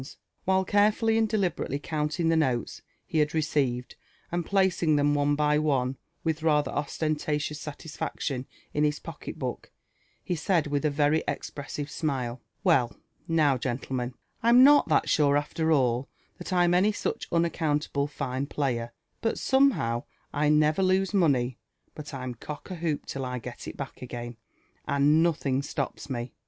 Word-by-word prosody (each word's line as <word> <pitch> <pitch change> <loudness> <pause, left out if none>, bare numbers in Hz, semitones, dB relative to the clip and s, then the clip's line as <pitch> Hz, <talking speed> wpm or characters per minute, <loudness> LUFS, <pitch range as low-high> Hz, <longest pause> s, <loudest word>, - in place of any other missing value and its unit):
While 190 0 +2
carefully 215 +3 +3
and 220 -1 +2
deliberately 190 -9 0
counting 155 +2 -1
the 165 - +3
notes 130 -8 0 0.2
he 160 - -1
had 150 0 +2
receiv 140 -6 +1
ed, - - -17 0.4
and 175 0 0
placing 190 -5 +2
them 145 0 +3
one 145 0 +2
by 150 0 +2
one 135 -4 +1 0.3
with 160 -1 -1
rather 150 -3 +2
ostentatious 150 0 -2
satisfaction 150 -3 -4 0.3
in 150 - +1
his 150 0 +2
pocket - - -8
book, - - -5 0.6
ho - - +1
said 170 0 +1
with 145 0 -1
a - - +4
very 145 +2 +2
expressive 145 0 -5
smile, 130 -5 -2 0.2
•'Well 130 -10 +3 0.3
now, 150 -5 +3
gentlemen, 125 0 -3 0.3
Fm 235 +2 +7
not 290 +2 +7
that 155 - +3
sure, 145 -2 +4
after 160 +2 -1
all, 130 -3 +2 0.3
(hat - - -7
I'm 175 -1 +3
any 190 +4 +4
such 205 - -3
unaccountable 155 -4 0
fine 140 -2 -3
player; 120 -5 -2 0.3
but 225 - 0
somehow 260 - +2 0.3
I 150 0 +2
never 150 +3 +3
lose 190 +1 +2
money 135 - +2 0.3
but 150 0 -8
I'm 130 -3 -5
cock 145 - -8
a - - -3
hoop 160 -3 -2
till 135 - -4
I 125 0 -3
get 125 0 -8
it - - -7
back 140 - -7
again»and 120 +5 -1
nothing 140 -5 +1
stops 140 - -4
me. 120 -1 -4
150 Hz, 155 wpm, -27 LUFS, 135-165 Hz, 0.6 s, Fm